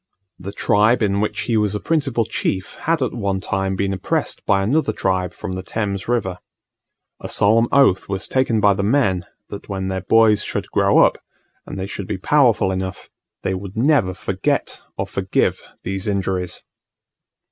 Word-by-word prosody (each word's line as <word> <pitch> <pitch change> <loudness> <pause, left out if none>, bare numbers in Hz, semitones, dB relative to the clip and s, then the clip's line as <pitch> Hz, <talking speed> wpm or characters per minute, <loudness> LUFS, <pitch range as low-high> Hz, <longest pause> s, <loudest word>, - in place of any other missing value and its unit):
The 95 +2 -6
tribe 105 +4 +2
in 100 -1 +1
which 105 - -1
he 115 - -1
was 105 -1 +1
a - - -1
principal 135 -7 0
chief 95 -1 -2
had 160 -3 0
at 125 - -2
one 100 -4 -1
time 95 0 -2
been 100 0 -1
oppressed 95 - -2
by 95 -1 +3
another 130 +3 +1
tribe 95 -3 -1
from 95 +3 -7
the 95 0 -4
Thames 100 0 -3
River. 100 -7 -1 0.8
A - - -7
solemn 115 +3 +3
oath 135 -11 +3
was 95 0 -3
taken 130 -4 +1
by 100 -1 +5
the 100 - -2
men 100 -5 +1 0.2
that 100 - -9
when 95 -1 -3
their 95 0 -2
boys 105 +1 +4
should - - -4
grow - - +3
up, - - +4 0.5
and - - -7
they 95 - -3
should 100 -1 -6
be 105 - -3
powerful 120 -3 +3
enough, 95 0 -5 0.3
they 95 - 0
would 95 +2 -6
never 120 - +2
forget 85 - -2 0.2
or - - -1
forgive - - 0 0.2
these 95 +2 -3
injuries. 95 -3 -2
100 Hz, 175 wpm, -20 LUFS, 95-115 Hz, 0.8 s, by